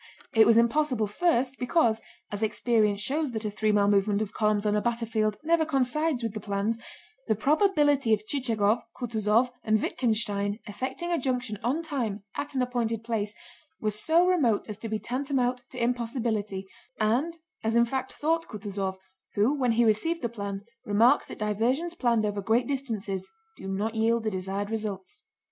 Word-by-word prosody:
It 225 -1 +6
was 230 -1 +6
impossible 240 -1 +2
first 260 - +1
because—as 230 -6 -1
experience 215 -1 +2
shows 290 +2 -1
that 220 -1 -4
a 210 - -1
three 215 +1 +1
mile 205 -1 +3
movement 200 0 +3
of 210 - -8
columns 210 -1 +1
on 210 0 +2
a 210 - +2
battlefield 225 -2 0
never 330 +1 +3
coincides 280 -1 0
with 225 -3 -2
the 215 - -4
plans—the 220 - -3
probability 290 - +3
of 215 -1 +2
Chichagóv, 230 -4 +1 0.2
Kutúzov, 230 0 +1
and 215 0 +3
Wittgenstein 210 -4 0
effecting 260 +11 -4
a 340 - +2
junction 250 -5 -2
on 280 +8 0
time 235 -10 -3
at 285 - -4
an 260 - +2
appointed 230 -3 -1
place 215 -3 -2 0.4
was 215 -1 -1
so 335 +2 +4
remote 290 - +2
as 210 -1 -7
to 225 - -5
be 220 - 0
tantamount 250 +2 -1
to 255 - -11
impossibility, 230 -5 -1 0.3
as 255 +1 -1
in 235 0 +5
fact 260 +2 -3
thought 330 +2 0
Kutúzov, 195 -3 -4 0.4
who 215 +7 +3
when 255 -5 +1
he 235 +1 +3
received 275 +10 +1
the 235 - 0
plan 200 -3 -5 0.2
remarked 215 +4 +4
that - - -8
diversions 235 - 0
planned 235 -9 +1
over 205 -1 -2
great 225 +5 +2
distances 220 -8 -3 0.3
do - - -9
not 205 +3 -1
yield 225 +1 +2
the 215 - 0
desired 195 +2 -3
results. 205 - -5
230 Hz, 165 wpm, -27 LUFS, 210-260 Hz, 0.4 s, It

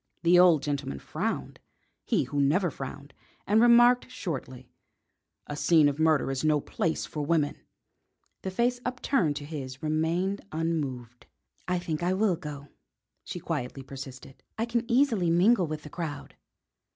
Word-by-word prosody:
The 175 +1 +6
old 175 -5 +6
gentleman 140 - -3
frowned - - -4 0.5
he - - +2
who 145 -1 -1
never 165 +5 +2
frowned 140 +1 -8 0.3
and 215 +2 +4
remarked 240 +1 +6
shortly: 135 - -6 0.7
"A 145 - -5
scene 155 0 +4
of 145 +1 -1
murder 155 -4 +3
is 135 +1 -3
no 155 -1 +3
place 160 +3 -2
for 150 - -4
women." 150 -1 0 0.8
The 190 - -3
face 240 +6 0
upturned 250 - 0
to 145 0 -6
his 140 -2 -7
remained 165 +6 0
unmoved. 140 -7 -3 0.4
"I 180 0 +1
think 170 -3 -3
I 180 +2 +1
will 195 -1 +2
go," 145 -3 -8 0.5
she 175 - -6
quietly 140 -5 -4
persisted. 135 0 -10 0.2
"I 225 - 0
can 235 -1 -2
easily 235 -9 +3
mingle 180 +3 +4
with 155 -1 -5
the 150 - -9
crowd." 165 -4 -6
160 Hz, 150 wpm, -28 LUFS, 145-185 Hz, 0.8 s, The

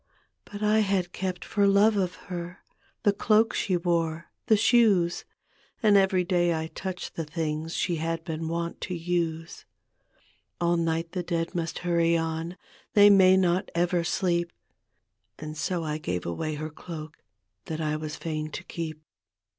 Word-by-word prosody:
But 205 +1 -7
I 210 +1 +4
had 195 -4 +1
kept 185 -1 -4
for 200 -1 +2
love 205 +2 +5
of 185 -3 0
her 175 -1 -6 0.4
The 205 -2 +4
cloak 215 +2 +3
^ 180 -3 0
wore, 165 -1 0 0.2
the 220 - +5
shoes. 205 -7 +3 0.6
And 210 -2 +5
every 190 -2 +4
day 175 -1 +2
I 160 0 -4
touched 185 -2 -5
the 165 - -3
things 155 +1 -3
She 175 -2 0
had 165 +1 -2
been 160 0 -4
wont 170 +1 -3
to 185 - -3
use. 165 -1 -2 1.0
All 175 0 +2
night 165 0 -1
the 180 - -2
dead 170 -1 -2
must 165 -2 -3
hurry 170 -1 +3
on, 165 +2 -3 0.4
They 205 0 +8
may 190 -1 +7
not 185 +1 +1
ever 175 0 +1
sleep. 170 0 0 0.9
And 155 0 -7
so 170 +3 -2
I 155 0 -3
gave 90 - -3
away 150 - -3
her 155 +1 -5
cloak 155 -1 -8 0.5
That 160 -1 -4
I 155 -1 -1
was 155 -1 -5
fain 155 -2 -4
to - - -5
keep. 155 -2 -6
170 Hz, 160 wpm, -27 LUFS, 160-185 Hz, 1.0 s, They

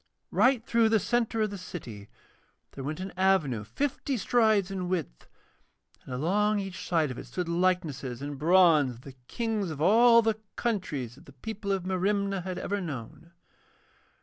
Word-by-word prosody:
Right 250 -3 +3
through 230 -1 +3
the 220 -1 +4
centre 230 0 0
of 210 - -1
the 200 - -6
city 115 - -8 0.6
there 135 - -8
went 150 +4 -4
an 190 0 -6
avenue 175 - +2
fifty 270 - -2
strides 215 -3 +2
in 185 -2 -3
width, 170 - -3 0.8
and - - -10
along 205 +9 +1
each 195 -2 -6
side 160 -5 +2
of 125 - -7
it - - -9
stood 180 -2 -4
likenesses 170 -8 -1
in 145 +1 -5
bronze 155 -3 +4
of 115 - -15
the 135 0 -11
Kings 220 -5 -2
of 155 -3 -6
all 230 +7 +6
the 220 -1 0 0.2
countries 155 - -2
that 135 - -18
the 140 - -14
people 200 - -5
of 195 -2 0
Merimna 195 +1 0
had 185 0 -5
ever 200 0 -2
known. 155 0 -7
185 Hz, 170 wpm, -28 LUFS, 150-215 Hz, 0.8 s, all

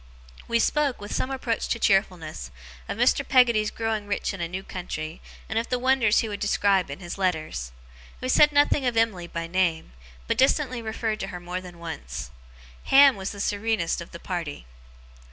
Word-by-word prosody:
We 235 - +2
spoke, 285 +3 +1
with 205 +1 -7
some 255 - -1
approach 255 -4 -2
to - - 0
cheerfulness, 180 - 0 0.4
of - - -3
Mr. - - +3
Peggotty's 235 -5 +4
growing 220 -2 -2
rich 200 - -1
in 195 - -6
a 170 - -1
new 185 +3 -5
country, 165 -3 -6 0.3
and 220 - 0
of 230 - -4
the 250 - +1
wonders 250 -4 +3
he 225 - -3
would 205 -1 -5
describe 200 -4 +2
in 140 - -6
his 175 +2 -7
letters. 155 - -1 0.5
We 255 - -4
said 295 +3 +6
nothing 290 -1 +3
of 240 -2 0
Emily 205 -7 +1
by 170 0 -4
name, 170 - 0 0.3
but - - -1
distantly 260 -2 +2
referred 220 -1 -2
to 195 - -3
her 180 - -6
more 180 +1 -5
than 180 -2 -11
once. 65 - -6 0.5
Ham 275 -1 +7
was 190 -1 -4
the 200 - -8
serenest 205 -4 0
of 170 - -9
the - - -9
party. 170 - -5
200 Hz, 190 wpm, -25 LUFS, 170-230 Hz, 0.5 s, Ham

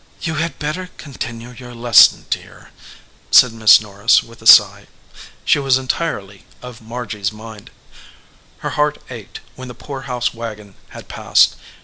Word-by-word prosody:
"You 160 - -3
had 165 -4 -4
better 155 +5 -5
continue 120 -4 -8
your 125 0 -12
lesson, 120 0 +4
dear," - - -7 0.6
said 125 -3 +5
Miss 110 -1 +6
Norris, 105 +2 +1
with 115 0 -17
a 110 - -4
sigh. 100 -2 +6 0.6
She - - +3
was 135 -2 +2
entirely 130 -8 -5
of 125 -2 -12
Margy 115 -2 -8
s 100 +1 -1
mind. 110 -1 -12 1.0
Her - - -2
heart 150 0 -1
ached 115 -5 -10
when 130 0 -10
the 125 - -10
poor 135 +3 -9
house 125 0 -2
wagon 110 -3 -9 0.2
had - - -13
passed. - - +2
120 Hz, 150 wpm, -17 LUFS, 110-130 Hz, 1.0 s, Miss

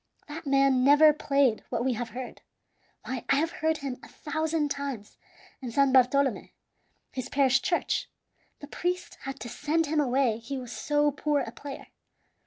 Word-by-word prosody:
That 305 +1 -8
man 275 -2 +3
never 295 +3 +7
played 275 -6 +1
what 235 - -2
we 260 - +2
have 235 0 -4
heard. 250 +2 -8 0.6
Why, 255 -1 -4
I 275 - +5
have 320 +4 +1
heard 320 0 0
him 275 -4 -5
a - - -12
thousand 315 0 -2
times 275 -7 -5 0.5
in 255 - -5
San 275 +2 +3
Bartolome, 260 -2 +3 0.6
his 255 -3 -5
parish 270 -1 +3
church; 345 - -1 0.5
the 290 - -8
priest 355 +3 -3
had 270 0 -5
to - - -5
send 300 +7 0
him 305 +1 0
away 255 -4 +1
he 260 +4 -5
was 250 -2 -7
so 295 +2 +1
poor 290 0 0
a - - -5
player. 280 -1 -9
275 Hz, 170 wpm, -28 LUFS, 255-295 Hz, 0.6 s, never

